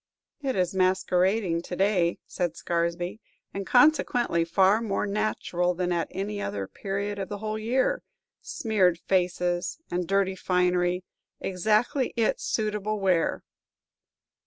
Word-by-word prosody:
"It 270 -2 -1
is 180 0 0
masquerading 185 0 +2
to 180 - -6
day," 185 -3 +2
said 175 -2 -3
Scaresby, 170 +4 -2 0.3
"and, 195 -1 -4
consequently, 245 - +3
far 190 +5 +3
more 210 -3 -1
natural 200 -4 -1
than 180 0 -1
at 170 -1 0
any 205 +2 -4
other 100 - -3
period 200 - -4
of 195 - -4
the 205 - -4
whole 215 +1 -3
year. 260 - +1 0.4
Smeared 195 -7 +1
faces 180 -1 0
and 175 -1 -1
dirty 195 0 +1
finery, 180 -1 +1 0.4
exactly 220 - +1
its 225 -2 +1
suitable 215 -1 -1
wear!" 185 -4 +1
190 Hz, 125 wpm, -27 LUFS, 180-215 Hz, 0.4 s, consequently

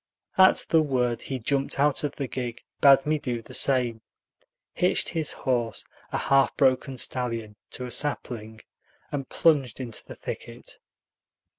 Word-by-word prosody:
At 190 0 +5
the 160 - +5
word 125 -5 0
he 135 - -4
jumped 135 +3 -1
out 145 +1 +2
of 145 - -2
the 140 - -3
gig, 120 -2 -5 0.2
bade 135 -1 +6
me 155 0 +1
do 120 -4 -4
the - - -13
same, 125 -4 +2 0.7
hitched - - +1
his 160 -2 0
horse, 120 -5 -2 0.3
a - - -1
half 135 0 +2
broken 130 -1 +2
stallion, 115 -5 -1
to 125 - -6
a 125 - -7
sapling, 110 -7 -1 0.5
and 140 -2 -4
plunged 140 -8 +2
into 120 -4 -5
the - - -11
thicket. - - -8
130 Hz, 150 wpm, -26 LUFS, 120-140 Hz, 0.7 s, bade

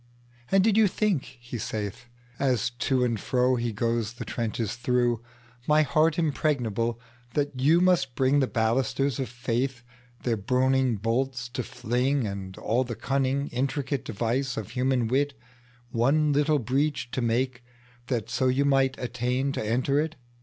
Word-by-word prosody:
And 195 -1 +5
did 215 0 +3
you 220 -2 +6
think, 190 - -1
he 120 0 -7
saithAs 120 +3 -3
to 130 -2 +2
and 115 -3 -1
fro 125 +2 +2
he 120 -1 -1
goes 115 +1 -1
the 120 - -7
trenches 115 -2 -2
through, 120 -1 +1 0.5
My 150 +1 +5
heart 155 +1 +2
impregnable, 125 -8 0 0.4
that 145 -3 -1
you 160 +6 +5
must 175 -9 +2
bringThe 135 +1 +3
ballisters 130 +4 0
of 130 -4 -2
faithTheir 120 -2 -4
burning 130 +1 +2
bolts 125 +4 -1
to 125 +1 -3
fling, 125 +2 0
And 95 -2 -5
all 120 +3 +1
the 120 -2 -5
cunning 135 +2 0
intricate 135 +1 -2
deviceOf 115 0 -2
human 125 -2 +1
wit, 140 +4 +1 0.6
One 145 +6 +2
little 150 +1 +3
breach 130 0 -1
to 130 - -2
makeThat 125 0 -3
so 130 +2 0
you 130 +2 +2
might 135 -1 +3
attain 125 +2 -1
to 135 - -3
enter 130 +6 +1
it? 160 +1 -1
125 Hz, 140 wpm, -27 LUFS, 120-135 Hz, 0.6 s, you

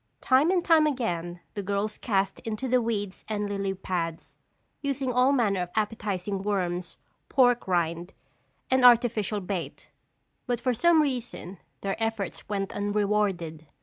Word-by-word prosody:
Time 270 +5 +4
and 360 -2 +1
time 315 -2 +5
again 175 - -2
the 205 - -3
girls 200 +2 -2
cast 195 -4 0
into 225 +3 -4
the 250 0 +3
weeds 205 -4 -3
and 210 -1 -2
lily 195 -1 -2
pads, 170 -3 -4 0.4
using 275 -3 -1
all 250 +2 +4
manner 215 -9 +2
of 180 - -3
appetizing 205 -3 -2
worms, 180 -4 -2 0.3
pork 245 -4 +3
rind 175 0 0 0.6
and 260 -1 +3
artificial 230 -4 +5
bait 185 -2 -5 0.6
but 245 -2 0
for 255 +1 +1
some 320 +5 +4
reason, 245 -9 -4 0.2
their 195 +3 -2
efforts 220 -4 -3
went 195 -2 -2
unrewarded. 200 -6 -1
210 Hz, 140 wpm, -27 LUFS, 190-245 Hz, 0.6 s, time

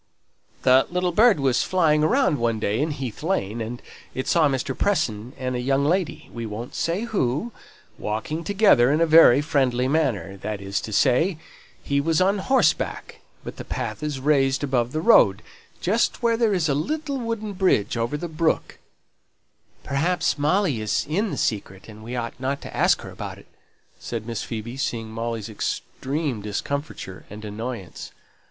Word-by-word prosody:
"The 130 +1 +5
little 180 0 0
bird 215 -1 +5
was 130 -3 +2
flying 155 -5 +2
about 260 - +3
one 115 -5 0
day 105 0 0
in 155 - 0
Heath 135 -6 -5
Lane, 120 - -1
and 120 +2 -6 0.3
it 130 - -3
saw 160 -4 +4
Mr. 135 0 -2
Preston 120 - -1
and 130 -1 -3
a - - -1
young 135 +2 +1
lady 180 +3 -1
we 115 -1 -5
won't 110 +3 -6
say 170 +4 -1
who 200 - -1 0.5
walking 110 +10 -3
together 190 - +4
in 150 - +2
a 165 - +4
very 155 -5 +7
friendly 130 -5 +1
manner, 120 - 0
that 105 +1 -4
is 100 +1 -3
to 110 - -7
say, 150 - +3 0.5
he 140 0 +1
was 160 +1 +1
on 195 +2 +2
horseback; 265 +6 0 0.2
but - - -8
the - - -6
path - - -4
is 150 -3 -3
raised 135 -1 +2
above 125 -3 0
the 155 - -2
road, 230 - +5 0.4
just - - +1
where 230 -1 +3
there 225 -2 +2
is 180 -5 +1
the 145 - +2
little 280 - -2
wooden 230 -3 -3
bridge 185 - +1
over 120 +5 -1
the 175 - -4
brook 160 0 -1 0.5
" - - -39
"Perhaps 160 +6 0
Molly 150 - +1
is 110 - 0
in 200 +9 0
the - - -4
secret, 95 -3 -2
and 110 -1 -12
we 120 +3 -6
ought 115 -1 -3
not 135 +2 -2
to - - -9
ask - - +3
her - - -9
about - - -7
it," - - -16 0.5
said 115 -2 -5
Miss 115 -4 -4
Phoebe, 115 +2 -6
seeing 115 -5 -3
Molly's 115 -1 -4
extreme 130 +4 -3
discomfiture 105 -1 -5
and 105 +1 -9
annoyance. 105 -2 -6
135 Hz, 175 wpm, -24 LUFS, 115-165 Hz, 0.5 s, very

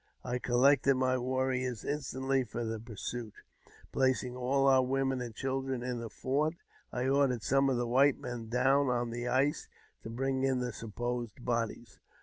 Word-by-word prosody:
I 125 0 -2
collected 135 +3 +4
my 130 0 +1
warriors 130 -2 -1
instantly 135 -2 -1
for 120 0 -5
the 110 0 -3
pursuit, 115 0 -6 0.6
placing 130 -1 +1
all 135 +2 +1
our 130 -1 +6
women 135 0 0
and 120 -3 -6
children 135 -1 -2
in 125 -1 -3
the 115 -1 -5
fort. 150 +8 -1 0.4
I 125 +1 -1
ordered 135 -4 +2
some 135 +1 +3
of 130 - +1
the 120 - 0
white 130 +4 +4
men 120 -2 -6
down 135 +3 +3
on 120 -1 0
the 120 +1 -4
ice 135 +4 +1 0.3
to - - -8
bring 130 +3 -1
in 135 -1 +2
the 125 -2 -3
supposed 120 +2 -4
bodies. 115 -1 -2
125 Hz, 165 wpm, -32 LUFS, 120-135 Hz, 0.6 s, our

